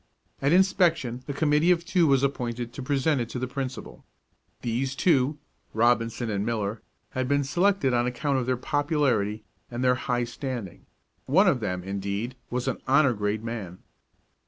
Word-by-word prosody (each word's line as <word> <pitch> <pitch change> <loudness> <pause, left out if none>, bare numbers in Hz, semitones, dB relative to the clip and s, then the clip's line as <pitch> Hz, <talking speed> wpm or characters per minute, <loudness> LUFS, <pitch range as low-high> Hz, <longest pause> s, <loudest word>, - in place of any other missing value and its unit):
At 140 +1 +2
inspection 170 - +2
a 140 - -3
committee 150 +3 +2
of 175 -1 +3
two 175 -2 +3
was 135 -1 +3
appointed 120 -3 -2
to - - -6
present 140 +1 +1
it 120 - -4
to 125 - -5
the 125 - -1
principal. 130 0 -6 0.6
These 125 +3 -1
two, 145 -3 +2 0.4
Robinson 115 +1 +2
and 100 -1 -1
Miller, 110 -1 -2 0.3
had 130 0 -2
been 140 +1 +2
selected 175 -1 +2
on 120 0 +2
account 135 +2 0
of 125 - -3
their 130 -1 +1
popularity 130 -7 0 0.3
and 120 +1 -4
their 125 0 +5
high 125 -1 -1
standing; 120 - -6 0.4
one 185 +10 +5
of 140 -8 +3
them, 90 -5 -3
indeed, 100 +5 -3
was 125 0 -2
an - - -1
honor 140 -1 +4
grade 105 0 -2
man. 110 -6 -5
125 Hz, 165 wpm, -26 LUFS, 115-145 Hz, 0.6 s, their